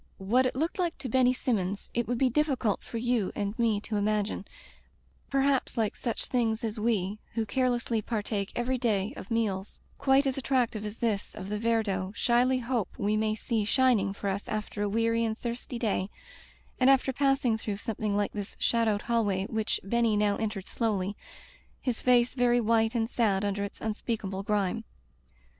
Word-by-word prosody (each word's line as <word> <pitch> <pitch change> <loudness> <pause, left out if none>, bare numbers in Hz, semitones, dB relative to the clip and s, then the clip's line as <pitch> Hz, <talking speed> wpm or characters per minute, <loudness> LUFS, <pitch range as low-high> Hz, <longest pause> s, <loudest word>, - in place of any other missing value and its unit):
What 240 +7 +2
it - - -4
looked 325 +7 -1
like 345 -2 0
to 270 -2 -5
Benny 255 +1 +4
Sinmions 205 -6 -2
it 240 0 0
would 245 - 0
be 265 - +3
difficult 255 -5 +1
for 230 - -6
you 235 -4 0
and 205 0 -1
me 225 -3 +2
to 220 - -7
unagine 210 -1 0 0.4
— - - -36
perhaps 275 -2 +1
like 220 -3 +1
such 235 -3 -3
things 230 -3 0
as 220 -1 -2
we, 210 -2 0 0.2
who 225 -1 0
care 255 +5 +1
lessly 235 -2 -1
partake 205 -3 -2
every 250 +1 0
day 210 -5 0
of - - -9
meals 210 -4 -1 0.2
quite 275 0 +4
as 270 0 0
attractive 250 -5 0
as 210 +2 -5
this 215 -4 -1
of 200 -2 -7
the 210 0 -2
Viardot, 210 -4 0
shyly 250 +2 +3
hope 240 -5 -1
we 205 +1 +1
may 215 0 +1
see 220 0 -1
shining 225 -3 +3
for 200 0 -5
us 195 +1 -2
after 215 -1 -3
a 205 - +1
weary 230 +2 +1
and 220 -1 -1
thirsty 240 +1 -5
day, 210 -4 0 0.7
and 255 +1 +5
after 270 0 +4
passing 270 -4 +2
through 215 -2 -3
some 215 +1 -4
thing 210 -2 0
like 205 -1 0
this 205 -2 -6
shadowed 225 -3 +1
hallway 205 -5 +1
which 220 -1 -1
Ben 235 +4 +1
ny 220 -2 +3
now 205 -1 +2
entered 210 -3 -3
slowly, 205 -4 -1 0.6
his 250 -4 -2
face 245 -1 +4
very 245 -1 +3
white 225 0 +2
and 225 -1 +1
sad 205 -5 +1
under 200 0 -1
its 200 - -6
unspeakable 210 -3 -3
grime. 200 -2 0
225 Hz, 190 wpm, -29 LUFS, 205-245 Hz, 0.7 s, and